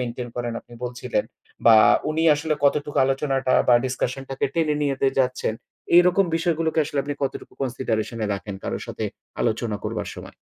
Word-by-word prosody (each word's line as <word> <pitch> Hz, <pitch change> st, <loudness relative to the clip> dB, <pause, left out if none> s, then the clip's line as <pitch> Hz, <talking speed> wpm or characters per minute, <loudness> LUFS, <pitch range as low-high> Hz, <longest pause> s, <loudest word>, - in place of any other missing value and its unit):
maintain 120 Hz, 0 st, -4 dB
করেন, 120 Hz, -1 st, -2 dB
আপনি 120 Hz, -, -16 dB
বলছিলেন। 125 Hz, -3 st, -2 dB, 0.4 s
বা 115 Hz, -1 st, +9 dB, 0.3 s
উনি 160 Hz, +1 st, 0 dB
আসলে 155 Hz, +1 st, -1 dB
কতটুকু 145 Hz, +1 st, +1 dB
আলোচনাটা 135 Hz, -1 st, 0 dB, 0.2 s
বা 120 Hz, -, +7 dB
discussion 130 Hz, +1 st, -2 dB
টাকে 135 Hz, -, 0 dB
টেনে 155 Hz, -3 st, +1 dB
নিয়ে 140 Hz, -1 st, +1 dB
দে 135 Hz, -, +5 dB
যাচ্ছেন। 125 Hz, -3 st, 0 dB, 0.4 s
এরকম 180 Hz, +2 st, +5 dB
বিষয় 165 Hz, 0 st, +1 dB
গুলোকে 160 Hz, 0 st, 0 dB
আসলে 145 Hz, -1 st, -4 dB
আপনি 145 Hz, 0 st, -4 dB
কতটুকু 135 Hz, -, -4 dB
consideration 120 Hz, -3 st, -2 dB
এ -, -, 0 dB
রাখেন, 100 Hz, +1 st, -6 dB
কারো -, -, -3 dB
সাথে -, -, -4 dB, 0.4 s
আলোচনা 110 Hz, -2 st, 0 dB
করবার -, -, -3 dB
সময়? -, -, -10 dB
130 Hz, 170 wpm, -23 LUFS, 120-150 Hz, 0.4 s, বা